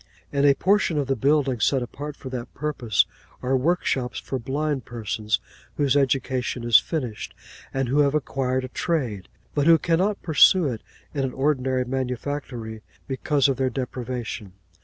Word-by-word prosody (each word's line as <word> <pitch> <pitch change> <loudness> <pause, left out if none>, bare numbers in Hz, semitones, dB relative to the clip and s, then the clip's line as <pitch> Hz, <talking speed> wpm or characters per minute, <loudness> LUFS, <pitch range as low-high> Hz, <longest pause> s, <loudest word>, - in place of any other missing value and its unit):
In 140 0 +2
a 140 -1 +6
portion 190 -3 +2
of 145 - +1
the 135 0 0
building, 135 -1 +2
set 130 +2 +2
apart 145 +4 -7
for 130 - -8
that 125 -2 -5
purpose, 125 -8 +1 0.4
are 130 +1 +2
work 165 +8 +1
shops 125 -3 -1
for 130 - -4
blind 140 +2 -2
persons 110 -1 -2 0.4
whose 140 -2 +2
education 130 -2 0
is 115 -3 +7
finished, 125 -9 -4 0.4
and 135 -1 -1
who 135 +5 +2
have 145 0 +3
acquired 130 -3 0
a - - -4
trade, 125 - -2 0.3
but 145 0 +1
who 165 -1 +8
cannot 185 +6 +1
pursue 170 +2 +6
it 120 -6 -2 0.3
in 140 -2 -1
an 130 -1 -2
ordinary 130 -2 +1
manufactory 125 -3 -4 0.3
because 140 +1 +1
of 135 -2 0
their 130 0 +1
deprivation. 125 -6 -5
135 Hz, 160 wpm, -24 LUFS, 125-145 Hz, 0.4 s, who